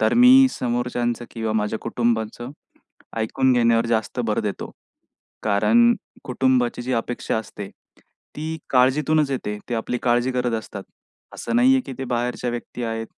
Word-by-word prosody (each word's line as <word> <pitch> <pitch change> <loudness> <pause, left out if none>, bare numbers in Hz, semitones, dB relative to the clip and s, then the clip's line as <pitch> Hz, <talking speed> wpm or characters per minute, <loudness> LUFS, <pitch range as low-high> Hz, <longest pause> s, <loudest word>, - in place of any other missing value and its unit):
तर 110 - +2
मी 255 +2 +8
समोरच्यांचं 120 - -2
किंवा 110 -2 -3
माझ्या 105 0 -1
कुटुंबाचं 115 0 -2 0.7
ऐकून 130 +4 +1
घेण्यावर 115 -1 +3
जास्त 115 +2 -1
भर 105 - 0
देतो. 105 -2 -4 0.7
कारण 235 - +4 0.3
कुटुंबाची 125 -1 +1
जी 130 +1 -3
अपेक्षा 120 0 -2
असते 105 -2 -7 0.7
ती 160 +1 -4
काळजीतूनच 140 +3 +3
येते. 105 -6 -3
ते 120 - -2
आपली 120 +2 -2
काळजी 120 +1 +1
करत 125 -1 -1
असतात. 100 -2 -8 0.5
असं 235 - -3
नाहीये 260 +2 +5
की - - -6
ते 135 - -3
बाहेरच्या 120 +1 -1
व्यक्ती 120 +1 -6
आहेत 115 0 -3
120 Hz, 140 wpm, -22 LUFS, 115-130 Hz, 0.7 s, मी